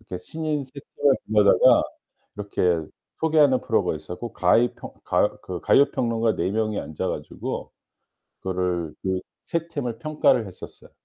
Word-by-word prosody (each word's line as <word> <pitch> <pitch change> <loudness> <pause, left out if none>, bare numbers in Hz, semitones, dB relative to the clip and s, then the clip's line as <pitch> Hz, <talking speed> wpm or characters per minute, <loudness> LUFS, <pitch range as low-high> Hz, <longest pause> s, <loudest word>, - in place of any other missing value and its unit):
이렇게 95 -5 -7
신인 150 - -3
3 130 - -19 0.3
팀을 145 -2 +4
불러다가 105 -2 +5 0.5
이렇게 95 -4 0 0.4
소개하는 150 -5 +4
프로가 - - +1
있었고 115 +6 -7
가이 115 +7 +3
평 - - -9
가요 - - +1
그 - - -5
가요 140 - +5
평론가 115 -2 0
4 - - -1
명이 110 0 -1
앉아 75 - -4
가지고 - - -5 0.7
그거를 90 -4 -2
그 95 -1 0 0.3
3 170 0 -2
팀을 125 -8 -4
평가를 135 -4 +2
했었어요. 95 - -12
115 Hz, 300 characters per minute, -24 LUFS, 95-140 Hz, 0.7 s, 불러다가